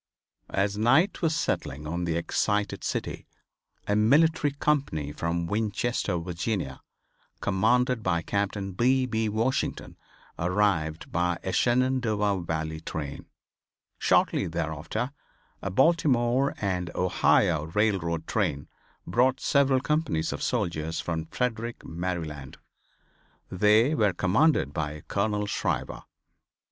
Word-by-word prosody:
As 100 Hz, +1 st, 0 dB
night 135 Hz, -, +3 dB
was 160 Hz, -2 st, +1 dB
settling 75 Hz, -, -2 dB
on 85 Hz, +3 st, -2 dB
the 85 Hz, -1 st, -1 dB
excited 105 Hz, +4 st, -1 dB
city -, -, -3 dB, 0.6 s
a 105 Hz, -, +2 dB
military 150 Hz, +8 st, +4 dB
company 140 Hz, -, -1 dB
from 85 Hz, +3 st, -2 dB
Winchester, 105 Hz, 0 st, -1 dB
Virginia, 85 Hz, -, -3 dB, 0.6 s
commanded 125 Hz, +5 st, +2 dB
by 85 Hz, -4 st, 0 dB
Captain 100 Hz, -1 st, -2 dB
B. 130 Hz, +6 st, +2 dB
B. 110 Hz, -3 st, -1 dB
Washington, 115 Hz, +5 st, -1 dB, 0.4 s
arrived 85 Hz, -3 st, 0 dB
by 85 Hz, 0 st, 0 dB
a 95 Hz, -, -2 dB
Shenandoah 120 Hz, -6 st, +1 dB
Valley 80 Hz, -1 st, -3 dB
train. 75 Hz, -3 st, -6 dB, 0.7 s
Shortly -, -, +2 dB
thereafter 80 Hz, -, -3 dB, 0.5 s
a -, -, -3 dB
Baltimore 135 Hz, -, +2 dB
and 90 Hz, -3 st, -1 dB
Ohio 85 Hz, -3 st, +2 dB
railroad 85 Hz, -3 st, 0 dB
train 70 Hz, 0 st, -1 dB, 0.4 s
brought 125 Hz, +8 st, +2 dB
several 135 Hz, -2 st, +3 dB
companies 150 Hz, -, 0 dB
of -, -, -6 dB
soldiers 80 Hz, -1 st, -1 dB
from 80 Hz, -2 st, -3 dB
Frederick, 120 Hz, 0 st, -3 dB
Maryland. 80 Hz, -5 st, -5 dB, 0.9 s
They 105 Hz, -, +4 dB
were 105 Hz, -9 st, +2 dB
commanded 100 Hz, -, +2 dB
by 75 Hz, 0 st, -3 dB
Colonel 105 Hz, 0 st, 0 dB
Shriver. 100 Hz, -, -2 dB
100 Hz, 110 wpm, -27 LUFS, 85-120 Hz, 0.9 s, military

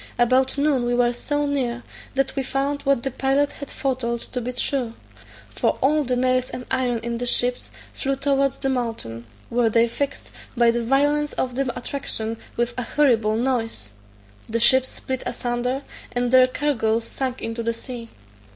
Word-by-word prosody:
About 255 Hz, +3 st, +3 dB
noon 280 Hz, -3 st, +2 dB
we 245 Hz, -, +1 dB
were 245 Hz, 0 st, +3 dB
so 290 Hz, +4 st, -1 dB
near, 250 Hz, -4 st, -1 dB, 0.3 s
that 270 Hz, 0 st, 0 dB
we 275 Hz, -, 0 dB
found 275 Hz, +2 st, -1 dB
what 275 Hz, -4 st, +2 dB
the 270 Hz, -, -1 dB
pilot 270 Hz, +3 st, +1 dB
had 285 Hz, -, -8 dB
foretold 250 Hz, -4 st, -2 dB
to 250 Hz, -, -4 dB
be 245 Hz, +2 st, -3 dB
true; 250 Hz, -2 st, -1 dB, 0.6 s
for -, -, +1 dB
all 300 Hz, +3 st, +3 dB
the 250 Hz, -2 st, 0 dB
nails 255 Hz, 0 st, +2 dB
and 250 Hz, -, -6 dB
iron 255 Hz, -2 st, +1 dB
in 235 Hz, 0 st, -2 dB
the 245 Hz, -, -2 dB
ships 245 Hz, +1 st, +2 dB, 0.2 s
flew 275 Hz, 0 st, -1 dB
towards 275 Hz, 0 st, +1 dB
the -, -, -2 dB
mountain, 225 Hz, -, -3 dB, 0.2 s
where 235 Hz, -1 st, +3 dB
they 230 Hz, +1 st, +4 dB
fixed, 280 Hz, +4 st, -4 dB, 0.3 s
by 235 Hz, -1 st, +5 dB
the 235 Hz, 0 st, -1 dB
violence 290 Hz, +4 st, +2 dB
of 255 Hz, -1 st, -1 dB
the 260 Hz, 0 st, 0 dB
attraction, 230 Hz, -3 st, -3 dB, 0.2 s
with 240 Hz, 0 st, 0 dB
a -, -, 0 dB
horrible 230 Hz, -5 st, +3 dB
noise; 225 Hz, -, -1 dB, 0.6 s
the 230 Hz, +1 st, 0 dB
ships 260 Hz, +2 st, +5 dB
split 260 Hz, -1 st, -4 dB
asunder, 250 Hz, +3 st, -2 dB, 0.3 s
and 245 Hz, 0 st, 0 dB
their 255 Hz, 0 st, +7 dB
cargoes 235 Hz, -5 st, 0 dB
sunk 260 Hz, +1 st, -3 dB
into 230 Hz, +1 st, -4 dB
the 230 Hz, 0 st, 0 dB
sea. 230 Hz, 0 st, -7 dB
250 Hz, 175 wpm, -23 LUFS, 235-270 Hz, 0.6 s, their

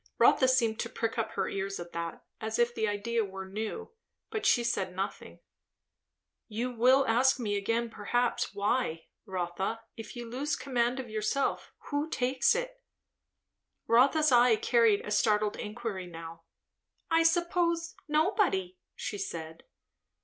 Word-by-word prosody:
Rotha 260 Hz, -, +5 dB
seemed 235 Hz, -4 st, +2 dB
to 230 Hz, -, -2 dB
prick 230 Hz, 0 st, -2 dB
up 220 Hz, -1 st, -2 dB
her -, -, -1 dB
ears 195 Hz, 0 st, -3 dB
at 175 Hz, 0 st, -8 dB
that, 170 Hz, 0 st, -5 dB, 0.2 s
as 220 Hz, 0 st, -3 dB
if 240 Hz, 0 st, +2 dB
the 220 Hz, -2 st, 0 dB
idea 220 Hz, +3 st, 0 dB
were 190 Hz, -1 st, -6 dB
new, 220 Hz, -, -5 dB, 0.4 s
but 435 Hz, -, -1 dB
she 240 Hz, -, +4 dB
said 195 Hz, -6 st, -1 dB
nothing. 195 Hz, +1 st, -5 dB, 1.1 s
"You 235 Hz, +3 st, -3 dB
will 255 Hz, +3 st, +4 dB
ask 255 Hz, +4 st, +3 dB
me 210 Hz, -4 st, -1 dB
again 230 Hz, +3 st, -1 dB
perhaps 240 Hz, +3 st, 0 dB
why? 200 Hz, -5 st, 0 dB, 0.2 s
Rotha, 190 Hz, +4 st, -3 dB
if 225 Hz, +2 st, -9 dB
you 240 Hz, -1 st, -6 dB
lose 275 Hz, +5 st, -2 dB
command 250 Hz, -1 st, 0 dB
of 245 Hz, -4 st, -6 dB
yourself, 215 Hz, +6 st, -1 dB, 0.2 s
who 290 Hz, +2 st, -1 dB
takes 265 Hz, -, +2 dB
it?" -, -, -4 dB, 1.0 s
Rotha's 275 Hz, +6 st, +4 dB
eye 245 Hz, -1 st, +6 dB
carried 225 Hz, -2 st, +3 dB
a 210 Hz, -, -5 dB
startled 210 Hz, 0 st, +2 dB
inquiry 210 Hz, -4 st, -5 dB
now. 165 Hz, -1 st, -10 dB, 0.7 s
"I 330 Hz, 0 st, +5 dB
suppose 335 Hz, 0 st, +1 dB
nobody," 300 Hz, -, +1 dB, 0.2 s
she 205 Hz, -, -5 dB
said. 165 Hz, -4 st, -6 dB
230 Hz, 140 wpm, -30 LUFS, 200-260 Hz, 1.1 s, eye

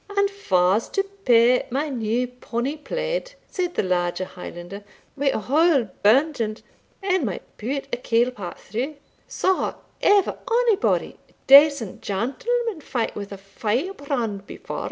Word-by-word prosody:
"And 400 Hz, 0 st, +3 dB
fa's 190 Hz, -, +1 dB
to 390 Hz, -, +4 dB
pay 250 Hz, -12 st, +3 dB
my 285 Hz, +5 st, -1 dB
new 240 Hz, -1 st, 0 dB
ponnie 250 Hz, +3 st, -4 dB
plaid," -, -, -3 dB
said 360 Hz, -2 st, -3 dB
the -, -, +1 dB
larger 180 Hz, 0 st, 0 dB
Highlander, 180 Hz, +2 st, -9 dB, 0.3 s
"wi' 280 Hz, 0 st, -1 dB
a -, -, 0 dB
hole 275 Hz, -, +3 dB
burnt 270 Hz, +6 st, +4 dB
in't 215 Hz, 0 st, -3 dB, 0.4 s
ane 375 Hz, -4 st, +1 dB
might 200 Hz, -7 st, -3 dB, 0.2 s
put 270 Hz, +5 st, -3 dB
a -, -, +1 dB
kail 240 Hz, 0 st, +1 dB
pat 200 Hz, -8 st, -7 dB
through? 255 Hz, +9 st, -4 dB, 0.3 s
Saw 380 Hz, 0 st, 0 dB, 0.3 s
ever 405 Hz, -1 st, +3 dB
onybody 470 Hz, -3 st, +1 dB
a -, -, -27 dB
decent 280 Hz, -6 st, +6 dB
gentleman 410 Hz, -, -2 dB
fight 240 Hz, -5 st, -2 dB
wi' 200 Hz, -1 st, -5 dB
a 200 Hz, -, -7 dB
firebrand 230 Hz, -, -3 dB
before?" -, -, -6 dB
255 Hz, 140 wpm, -23 LUFS, 215-355 Hz, 0.4 s, decent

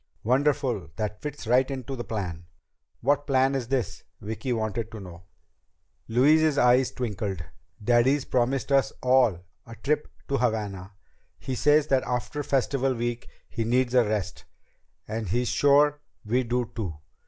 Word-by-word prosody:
"Wonderful! 130 Hz, -, +1 dB
That 105 Hz, +1 st, -4 dB
fits 145 Hz, -3 st, -6 dB
right 125 Hz, +4 st, +3 dB
into 135 Hz, -1 st, -5 dB
the 120 Hz, -, -5 dB
plan!" 90 Hz, -7 st, -5 dB, 0.5 s
"What 145 Hz, +3 st, +1 dB
plan 135 Hz, -1 st, +3 dB
is 130 Hz, -4 st, -2 dB
this?" 120 Hz, -7 st, -2 dB, 0.2 s
Vicki 110 Hz, +5 st, -4 dB
wanted 110 Hz, -1 st, -2 dB
to 110 Hz, -, -8 dB
know. 90 Hz, -2 st, -11 dB, 0.8 s
Louise's 150 Hz, +5 st, +4 dB
eyes 125 Hz, 0 st, +4 dB
twinkled. 100 Hz, -7 st, -3 dB, 0.4 s
"Daddy's 125 Hz, +5 st, +3 dB
promised 130 Hz, +2 st, 0 dB
us 135 Hz, -1 st, +3 dB
all 125 Hz, -9 st, +3 dB, 0.2 s
a 115 Hz, -, -9 dB
trip 150 Hz, +4 st, -1 dB, 0.2 s
to 140 Hz, -, 0 dB
Havana. 105 Hz, -5 st, -2 dB, 0.4 s
He 130 Hz, -, -5 dB
says 145 Hz, +4 st, +4 dB
that 135 Hz, -1 st, +3 dB
after 125 Hz, +4 st, -3 dB
Festival 135 Hz, -1 st, 0 dB
Week 120 Hz, 0 st, -3 dB, 0.2 s
he 115 Hz, -, -3 dB
needs 125 Hz, +2 st, +1 dB
a 125 Hz, -1 st, +5 dB
rest, 105 Hz, -3 st, -3 dB, 0.6 s
and 110 Hz, -2 st, -4 dB
he's 120 Hz, +4 st, 0 dB
sure 145 Hz, +1 st, +4 dB, 0.2 s
we 125 Hz, +4 st, +1 dB
do 120 Hz, 0 st, -1 dB
too. 90 Hz, -9 st, -4 dB
125 Hz, 145 wpm, -26 LUFS, 110-135 Hz, 0.8 s, a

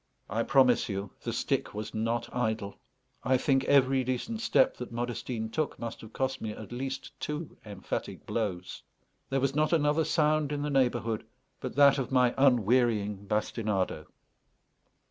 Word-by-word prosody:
I 110 Hz, +3 st, +1 dB
promise 125 Hz, -1 st, +4 dB
you, 100 Hz, 0 st, -4 dB
the -, -, -3 dB
stick -, -, -1 dB
was 105 Hz, 0 st, -5 dB
not 115 Hz, +2 st, -1 dB
idle; 110 Hz, -4 st, -2 dB, 0.4 s
I 130 Hz, +2 st, +3 dB
think 135 Hz, 0 st, +2 dB
every 135 Hz, -1 st, +4 dB
decent 130 Hz, -, -3 dB
step -, -, +3 dB
that -, -, -7 dB
Modestine 120 Hz, -1 st, -3 dB
took 155 Hz, +2 st, -2 dB
must 115 Hz, -1 st, -6 dB
have 110 Hz, -, -11 dB
cost 130 Hz, +2 st, -2 dB
me 110 Hz, -1 st, -3 dB
at 110 Hz, +1 st, -10 dB
least 130 Hz, +2 st, -4 dB
two 150 Hz, +4 st, -4 dB
emphatic 100 Hz, -3 st, -5 dB
blows. 95 Hz, -5 st, -3 dB, 0.5 s
There 135 Hz, -, +1 dB
was 135 Hz, 0 st, +1 dB
not 155 Hz, +2 st, +1 dB
another 150 Hz, 0 st, +3 dB
sound 155 Hz, -2 st, +2 dB
in 145 Hz, -1 st, -2 dB
the 150 Hz, -, -2 dB
neighbourhood 120 Hz, -5 st, +1 dB, 0.4 s
but 130 Hz, -, -5 dB
that 140 Hz, 0 st, +6 dB
of 130 Hz, -, -3 dB
my 125 Hz, -2 st, +4 dB
unwearying 115 Hz, -5 st, +2 dB
bastinado. 105 Hz, -2 st, -1 dB
125 Hz, 155 wpm, -29 LUFS, 110-140 Hz, 0.5 s, that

